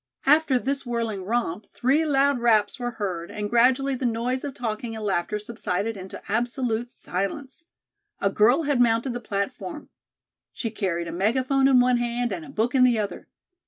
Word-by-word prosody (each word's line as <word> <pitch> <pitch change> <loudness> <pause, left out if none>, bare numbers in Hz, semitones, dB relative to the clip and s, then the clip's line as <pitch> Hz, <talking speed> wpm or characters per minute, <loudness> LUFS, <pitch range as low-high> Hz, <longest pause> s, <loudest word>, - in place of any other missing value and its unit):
After 295 -2 +4
this 275 +3 -2
whirling 230 -6 -3
romp, 210 -3 -2
three 280 +6 +1
loud 280 -2 +3
raps 220 -1 +2
were 245 0 -2
heard 180 -5 -3
and 205 0 -4
gradually 255 +3 +3
the 260 - -4
noise 240 +3 -1
of 285 -2 -5
talking 225 -1 -4
and 220 -1 -5
laughter 195 +1 0
subsided 215 -1 -3
into 190 -1 -8
absolute 240 +1 -1
silence. 260 - -5 0.5
A 200 - +1
girl 240 +10 +4
had 285 -4 +2
mounted 235 +2 +2
the 245 - -3
platform. 245 - -4 0.6
She 225 - -3
carried 170 -5 -2
a - - -4
megaphone 255 +9 +2
in 260 -2 +6
one 250 0 +4
hand 240 0 -1
and 170 -4 -5
a - - -11
book 225 +3 -1
in 260 -2 +5
the 245 -2 +4
other. 210 -2 -4
235 Hz, 175 wpm, -25 LUFS, 210-260 Hz, 0.6 s, in